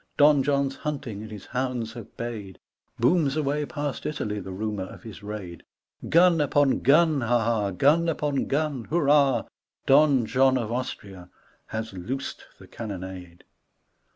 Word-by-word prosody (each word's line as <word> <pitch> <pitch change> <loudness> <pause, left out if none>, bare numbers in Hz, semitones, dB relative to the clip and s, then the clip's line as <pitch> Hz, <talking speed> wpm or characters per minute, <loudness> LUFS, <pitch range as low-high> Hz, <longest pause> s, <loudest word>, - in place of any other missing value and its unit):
Don 145 -1 +6
John's 140 -1 0
hunting, 135 -9 -4
and 110 - -8
his 105 -2 -9
hounds 125 -3 -3
have 120 -4 -11
bayed 110 -5 -6 0.4
Booms 145 +3 +2
away 150 0 -1
past 145 -2 -4
Italy 105 -9 -3
the 95 - -8
rumour 105 0 -3
of - - -12
his 110 -2 -10
raid. 100 -4 -7 0.5
Gun 170 -1 +5
upon 145 -1 +2
gun, 155 +1 +4
ha 120 +1 +2
1 115 - -1
ha 115 -3 +1
1 100 -2 -3
Gun 160 - +3
upon 150 -3 -1
gun, 145 -4 -1
hurrah 145 -4 +3
1 - - -16 0.4
Don 140 -3 +5
John 130 +3 +3
of 115 -2 -3
Austria 100 -7 -5 0.4
Has 110 -1 -5
loosed 120 +9 -5
the - - -14
cannonade. 95 -5 -8
125 Hz, 155 wpm, -26 LUFS, 105-145 Hz, 0.5 s, Don